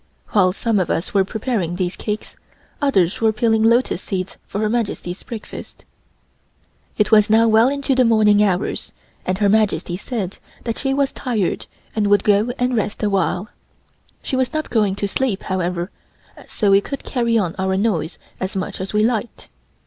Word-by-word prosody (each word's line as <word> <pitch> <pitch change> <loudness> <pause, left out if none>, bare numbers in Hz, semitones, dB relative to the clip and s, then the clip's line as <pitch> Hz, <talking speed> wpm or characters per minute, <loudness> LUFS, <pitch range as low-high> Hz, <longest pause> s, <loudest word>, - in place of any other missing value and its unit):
While 185 -3 +4
some 220 +2 0
of 180 - -1
us 165 - -1
were 195 -2 +4
preparing 205 -4 -2
these 180 0 -2
cakes, 210 0 -5 0.5
others 195 -11 +2
were 220 -1 +4
peeling 220 0 +2
lotus 230 -4 +3
seeds 185 -1 -4
for - - -5
Her 215 - +2
Majesty's 210 -5 -2
breakfast. 225 -3 -9 1.1
It 210 - +2
was 210 -1 +6
now 225 +1 +5
well 225 +2 +5
on 275 - +1
into 280 -1 0
the 260 0 +4
morning 215 -3 +4
hours 190 -2 0 0.3
and 185 0 0
Her 205 0 +2
Majesty 195 -5 +1
said 200 -3 -4 0.2
that 230 -2 -3
she 270 - 0
was 275 0 +1
tired 225 -8 -2 0.3
and 210 -2 +1
would 205 0 +4
go 210 +3 +3
and 250 0 0
rest 215 -1 -2
a 205 - +1
while. 190 +2 0 0.7
She - - -2
was 260 -1 +1
not 310 0 -3
going 210 -4 +2
to 200 0 -2
sleep, 215 -1 -1
however, 180 -1 -2 0.6
so 205 -3 +1
we 195 0 +6
could 275 +6 -6
carry 235 -3 +1
on 180 -6 0
our 190 0 +1
noise 190 -6 0 0.2
as 190 +1 -3
much 185 -1 -3
as 190 - -5
we 210 0 +3
liked. 230 0 -2
210 Hz, 180 wpm, -20 LUFS, 190-230 Hz, 1.1 s, was